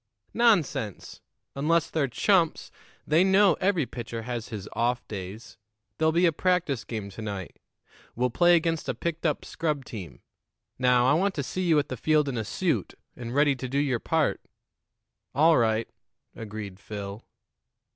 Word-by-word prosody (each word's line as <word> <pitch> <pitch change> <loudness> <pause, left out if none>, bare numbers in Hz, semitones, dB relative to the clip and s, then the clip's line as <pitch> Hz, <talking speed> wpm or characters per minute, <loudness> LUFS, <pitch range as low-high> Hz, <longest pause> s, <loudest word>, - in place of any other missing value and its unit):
"Nonsense! 155 - +1 0.3
Unless 160 +3 +1
they're 150 -4 +1
chumps, 170 - +1 0.3
they 160 +4 +4
know 190 0 +5
every 185 -6 +2
pitcher 115 -2 -6
has 120 -1 -4
his 105 -5 -7
off 120 +1 0
days. 100 +2 -8 0.4
There'll 160 0 +3
be 170 +3 +3
a 170 - +4
practice 170 -6 0
game 105 -4 -6
to 105 - -9
night; 100 -4 -6 0.6
we'll 125 +1 0
play 175 +7 +5
against 165 -1 0
a - - -1
picked 170 0 -2
up 150 - -2
scrub 150 -5 -2
team. 90 - -9 0.6
Now, 125 -1 +4
I 135 - +5
want 190 +5 +1
to 145 - -2
see 185 +8 -4
you 160 -2 +4
at 145 - +1
the 130 - -4
field 155 +3 +2
in 135 - -2
a 110 - -1
suit 170 - -1 0.2
and 120 0 -6
ready 145 -1 +4
to 130 0 -6
do 135 - -1
your 135 -4 +1
part." 160 +2 0 0.9
"All 160 +2 +5
right," 110 -1 +1 0.5
agreed 105 -3 -7
Phil. 100 0 -7
135 Hz, 165 wpm, -27 LUFS, 115-165 Hz, 0.9 s, know